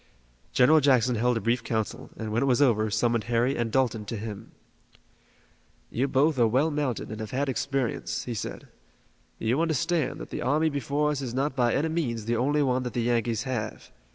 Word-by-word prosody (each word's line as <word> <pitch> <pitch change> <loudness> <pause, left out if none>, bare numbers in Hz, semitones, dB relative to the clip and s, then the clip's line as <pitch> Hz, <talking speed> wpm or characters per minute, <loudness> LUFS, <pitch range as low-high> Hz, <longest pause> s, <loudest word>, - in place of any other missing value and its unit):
General 155 +5 +5
Jackson 130 -4 +3
held 120 +1 +1
a - - -3
brief 115 +1 0
council, 110 -2 -3
and, 110 -1 -4
when 115 +2 +1
it 140 - +1
was 125 -1 +3
over, 110 -6 +3
summoned 115 +1 +1
Harry 120 +3 +1
and 115 -1 -1
Dalton 120 -4 +1
to 115 - -4
him. 105 -1 -7 1.4
"You 125 - 0
are - - -1
both 140 +1 +2
well 130 +7 +3
mounted 145 -8 -2
and 110 - -6
have 110 -1 -5
had 140 +4 -1
experience," 135 -1 -2
he 120 - -4
said. 110 - -6 0.7
"You 120 +7 0
understand 165 -1 0
that - - -9
the - - -4
army 150 +5 +2
before 145 +2 0
us 140 -2 -3
is 125 -3 -4
not 135 +1 0
by 120 -3 +2
any 155 +3 +1
means 120 -10 -2
the 120 +1 0
only 145 +5 +2
one 130 -1 +1
that 125 -3 -4
the 120 - 0
Yankees 115 -1 0
have. 120 -6 -4
125 Hz, 200 wpm, -27 LUFS, 115-140 Hz, 1.4 s, General